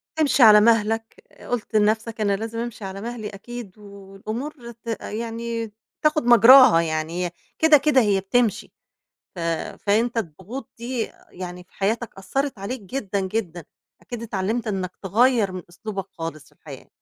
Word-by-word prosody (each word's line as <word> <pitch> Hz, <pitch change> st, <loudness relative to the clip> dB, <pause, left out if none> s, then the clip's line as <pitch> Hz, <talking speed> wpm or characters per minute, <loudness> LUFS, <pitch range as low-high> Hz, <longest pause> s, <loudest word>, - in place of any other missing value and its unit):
تمشي 295 Hz, -4 st, +3 dB
على 210 Hz, -2 st, +9 dB
مهلك، 225 Hz, -, +1 dB, 0.3 s
قُلت 240 Hz, -2 st, -3 dB
لنَفْسك 220 Hz, +1 st, +1 dB
أنا 200 Hz, -1 st, +2 dB
لازم 225 Hz, +3 st, -5 dB
أمشي 235 Hz, -3 st, -5 dB
على 195 Hz, +1 st, -6 dB
مهلي 230 Hz, -2 st, -5 dB
أكيد 220 Hz, 0 st, -9 dB
و -, -, -18 dB, 0.3 s
والأمور 235 Hz, +5 st, -6 dB
ت 235 Hz, 0 st, -20 dB
يعني، 230 Hz, 0 st, -4 dB, 0.3 s
تاخد 305 Hz, -2 st, +2 dB
مجراها 240 Hz, -5 st, +8 dB
يعني 165 Hz, +2 st, -2 dB
هي 175 Hz, -, -4 dB, 0.3 s
كده، 315 Hz, -1 st, +7 dB
كده 275 Hz, -1 st, +3 dB
هي 205 Hz, -3 st, +2 dB
بتمشي، 220 Hz, +2 st, 0 dB, 0.6 s
ف -, -, -7 dB, 0.4 s
فأنت 230 Hz, +4 st, +1 dB
الضغوط 205 Hz, -, -5 dB
دي 235 Hz, 0 st, -3 dB, 0.2 s
يعني 180 Hz, 0 st, -7 dB
في 180 Hz, -, -35 dB
حياتك 220 Hz, +3 st, -2 dB
أثّرِت 270 Hz, +7 st, -2 dB
عليك 225 Hz, +5 st, -5 dB
جدًا، 200 Hz, -1 st, -3 dB
جدًا، 190 Hz, -3 st, -3 dB, 0.4 s
أكيد 240 Hz, -2 st, -7 dB
اتعلمت 220 Hz, +1 st, -2 dB
إنك 190 Hz, -3 st, -2 dB
تغيّر 220 Hz, +1 st, +3 dB
من 185 Hz, 0 st, -6 dB
أسلوبك 195 Hz, +2 st, -6 dB
خالص 165 Hz, -2 st, -6 dB
في -, -, -23 dB
الحياة. -, -, -12 dB
220 Hz, 150 wpm, -23 LUFS, 195-240 Hz, 0.6 s, على